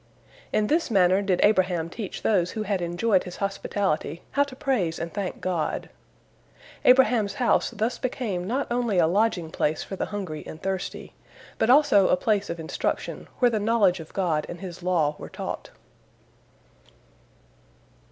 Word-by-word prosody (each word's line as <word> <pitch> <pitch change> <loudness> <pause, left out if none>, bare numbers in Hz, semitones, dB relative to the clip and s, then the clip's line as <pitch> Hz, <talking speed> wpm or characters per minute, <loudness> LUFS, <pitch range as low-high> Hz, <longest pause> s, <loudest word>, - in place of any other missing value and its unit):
In 215 - +2
this 315 +7 +1
manner 190 -2 +4
did 190 -3 +1
Abraham 185 -5 +3
teach 200 +3 -7
those 180 -5 +2
who 215 - -2
had 200 -3 -1
enjoyed 180 +3 +1
his 180 - -7
hospitality 195 -5 -2
how 285 - +2
to 275 -2 -11
praise 215 -12 0
and 170 - -5
thank 200 -3 -4
God. 175 -4 -2 0.9
Abraham's 250 -5 +4
house 245 - +2
thus 220 +4 -2
became 220 -9 -3
not 260 +6 0
only 240 -5 0
a 170 - +5
lodging 180 -2 +1
place 155 0 0
for 195 - -6
the - - -3
hungry 185 -7 -5
and 160 - -8
thirsty, 190 +1 -4 0.5
but 220 - +2
also 250 -8 +6
a - - +3
place 205 -1 0
of 170 - -4
instruction 160 - -3
where 245 -2 +4
the 220 - 0
knowledge 205 -4 +3
of 160 - -10
God 165 -6 0
and 175 - -7
His 180 -3 -8
law 165 -5 +1
were - - -8
taught. - - -6
195 Hz, 160 wpm, -25 LUFS, 175-225 Hz, 0.9 s, also